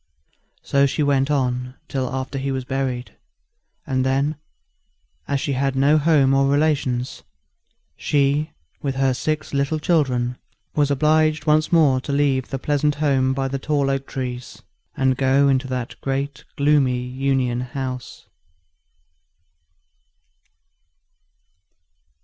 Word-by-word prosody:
So 140 0 +3
she 150 - -1
went 140 -1 +2
on 125 -2 -1
till 130 -2 -2
after 130 +1 -4
he 135 +1 -2
was 130 -1 -3
buried; 130 -2 -3 0.7
and 130 -1 0
then, 135 +3 +1 0.9
as 140 -1 0
she 140 - -2
had 135 0 0
no 140 +3 +4
home 145 -3 +3
or 135 0 +3
relations, 140 -4 0 0.7
she, 145 +2 +1 0.3
with 135 -2 -2
her 135 -1 +2
six 155 +4 -3
little 140 +3 0
children, 130 -7 0 0.3
was 145 -2 +2
obliged 155 +1 +2
once 155 0 +2
more 145 -6 +4
to 140 - -5
leave 140 -2 +1
the 135 - -3
pleasant 145 +2 0
home 135 -3 +1
by 135 0 -1
the 135 +1 -3
tall 140 -1 0
oak 135 0 -3
trees, 125 -2 -6 0.3
and 130 -1 +2
go 135 +1 +3
into 135 -1 +1
that 125 -2 -4
great 135 0 -3
gloomy 140 -3 +3
Union 125 -1 -1
House. 130 -1 -6
135 Hz, 125 wpm, -22 LUFS, 130-145 Hz, 0.9 s, no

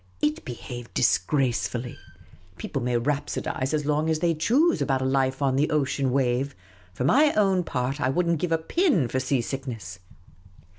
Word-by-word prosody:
It 150 +6 0
behaved 120 -1 -8
disgracefully. 120 +1 0 0.6
People 135 - -4
may 120 0 0
rhapsodise 135 0 -2
as 150 -2 -1
long 150 +2 +1
as 160 - +2
they 170 +1 +1
choose 265 - +2
about 135 -2 0
a - - -1
life 135 +1 +1
on 135 -1 +2
the 150 +2 +2
ocean 140 -2 0
wave; 130 +1 0 0.4
for 95 - -4
my 290 - +5
own 195 -3 +2
part, 135 -1 -2
I 130 - +2
would 175 +6 0
n't 170 -2 +1
give 175 0 -2
a 165 - +3
pin 190 - +1
for 130 - -1
sea 130 0 0
sick 135 +3 -5
nes.s. 100 -6 -7
135 Hz, 180 wpm, -25 LUFS, 125-160 Hz, 0.6 s, my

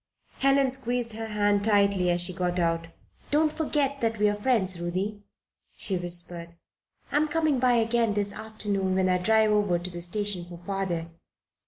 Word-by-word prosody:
Helen 275 -1 +3
squeezed 245 -3 +1
her 225 +1 -5
hand 205 -1 +1
tightly 200 -3 +3
as 175 0 +2
she 175 +1 +3
got 180 -1 -2
out 165 -1 0 0.4
"Don't 305 +1 +2
forget 290 -3 -1
that 225 -1 0
we 210 - +2
are 205 - +2
your 205 - -8
friends, 190 -8 +1
Ruthie," 190 +4 -3 0.6
she 195 - -1
whispered. 175 -1 -3 0.6
"I'm 305 +1 +2
coming 310 -3 +1
by 250 0 +3
again 230 -2 +1
this 205 -1 -1
afternoon 205 -3 -2
when 185 0 +2
I 180 0 +2
drive 220 +3 +3
over 205 -4 +2
to 180 +1 -5
the 175 0 -7
station 195 0 -2
for 175 0 -10
father. 175 -2 -3
205 Hz, 175 wpm, -27 LUFS, 180-230 Hz, 0.6 s, Helen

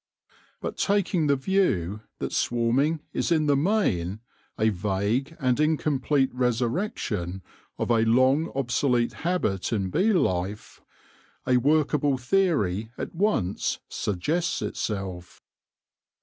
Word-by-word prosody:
But - - -4
taking 195 -5 +1
the 140 - +4
view 130 - 0 0.2
that - - -4
swarming 130 +7 +1
is - - -1
in 155 -2 +3
the 145 -1 +3
main 125 - +1 0.4
a 110 +1 +3
vague 105 - -1
and 130 -2 +1
incomplete 150 -3 +1
resurrection 120 - -1 0.3
of - - -1
a 115 - +4
long 130 +8 +3
obsolete 125 -2 +1
habit 165 - -1
in 100 -5 -1
bee 210 - +3
life, 100 - -1 0.6
a 125 -1 +3
workable 145 0 +2
theory 120 - +1
at - - -5
once 165 - 0
suggests 150 - -1
itself. 95 -4 -4
130 Hz, 110 wpm, -26 LUFS, 105-155 Hz, 0.6 s, the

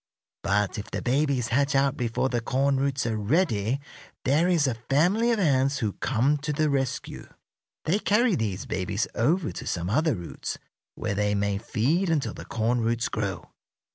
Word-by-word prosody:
But 105 +1 0
if 105 - -7
the - - -4
babies 130 -2 +1
hatch 140 +3 +1
out 135 0 +3
before 120 +1 0
the 120 -2 -1
corn 135 +3 +1
roots 135 -1 0
are 115 -2 0
ready 110 - +1 0.5
there 150 +6 +3
is 170 -5 +3
a 130 - +1 0.2
family 185 +12 +3
of 230 - +2
ants 140 -6 +2
who 110 -6 -1
come 135 +4 +1
to 150 +2 -3
the 150 0 +1
rescue. 135 -2 -2 0.6
They 185 +6 +2
carry 220 +2 +3
these 105 - -2
babies 100 +3 -1
over 165 +11 +1
to - - -7
some 90 +2 -2
other 155 +4 +2
roots, 85 -3 -6 0.4
where 110 -2 -2
they 105 0 +1
may 100 0 0
feed 140 - 0
until 155 -4 0
the - - -9
corn 120 +2 0
roots 115 +1 0
grow. 100 -6 -4
130 Hz, 175 wpm, -26 LUFS, 110-150 Hz, 0.6 s, out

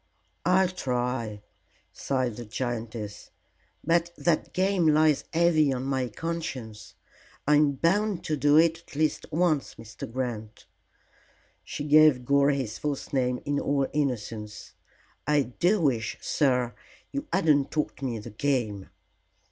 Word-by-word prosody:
"I'll 185 0 +4
try," 125 - -3 0.5
sighed 130 -4 -1
the 120 - -7
giantess; 110 -2 -5 0.5
"but 170 0 +2
that 170 -3 0
game 185 -2 +2
lies 155 -1 +4
heavy 160 -3 +3
on 130 -1 -2
my 130 -2 -1
conscience. 130 -6 -5 0.5
I'm 150 -1 +4
bound 190 +7 +1
to 155 - -1
do 145 +1 +4
it 165 0 +4
at 170 - -16
least 155 +1 0
once, 160 -3 +1
Mr. 115 0 -9
Grant." 115 -4 -5 1.0
She - - -5
gave 150 -4 +5
Gore 140 +1 +4
his 135 -6 -2
false 145 -2 -4
name 125 -2 0
in 145 0 0
all 140 -1 +1
innocence. 110 -7 -3 0.5
"I 150 -1 +3
do 175 - +1
wish, 120 -9 0
sir, 125 -4 +1 0.4
you 280 +2 -4
hadn't 150 -7 +3
taught 150 -2 -3
me 125 -4 -2
the 110 +2 -8
game." 110 -5 -1
140 Hz, 130 wpm, -27 LUFS, 120-155 Hz, 1.0 s, gave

